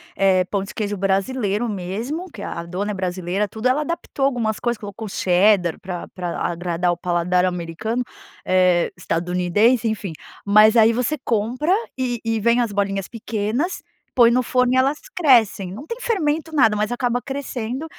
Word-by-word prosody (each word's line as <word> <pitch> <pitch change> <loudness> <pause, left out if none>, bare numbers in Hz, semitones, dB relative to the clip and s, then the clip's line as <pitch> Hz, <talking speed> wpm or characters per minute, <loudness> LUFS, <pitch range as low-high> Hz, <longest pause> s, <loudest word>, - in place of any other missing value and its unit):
eh, 190 -2 +3
pão 195 +1 -2
de 195 - -9
queijo 205 -1 -2
brasileiro 200 +3 0
mesmo, 225 - -4
que 210 - -10
a 170 - -5
dona 190 +5 -3
é - - -3
brasileira, 185 +2 -2
tudo 220 +3 -2
Ela 260 +4 +2
adaptou 300 -3 -2
algumas 235 -5 0
coisas. 240 -2 -1
Colocou 205 +1 -7
cheddar 180 -2 +3
pra 180 -2 -6
pra 175 -2 -5
agradar 175 0 -1
o 170 - -7
paladar 180 +1 +1
americano, 180 +7 -2 0.4
eh, 185 -2 +3
estadunidense 180 +8 +1
enfim. 205 -5 -4 0.3
Mas 215 +3 +6
aí 225 0 +6
você 250 +6 -1
compra 240 - 0 0.2
e 245 -2 -1
e 225 -1 0
vem 235 +3 +3
as 230 -3 -1
bolinhas 195 -1 -1
pequenas, 225 - -2 0.3
põe 235 -2 +6
no 250 +1 +3
forno 250 0 +2
e - - +3
elas 275 +3 +2 0.2
crescem. 230 - +3
Não 265 +9 -8
tem 465 +1 -5
fermento, 320 -7 -1
nada, 225 -7 +5
mas 210 0 0
acaba 245 0 0
crescendo. 270 0 -4
215 Hz, 165 wpm, -21 LUFS, 185-250 Hz, 0.4 s, Mas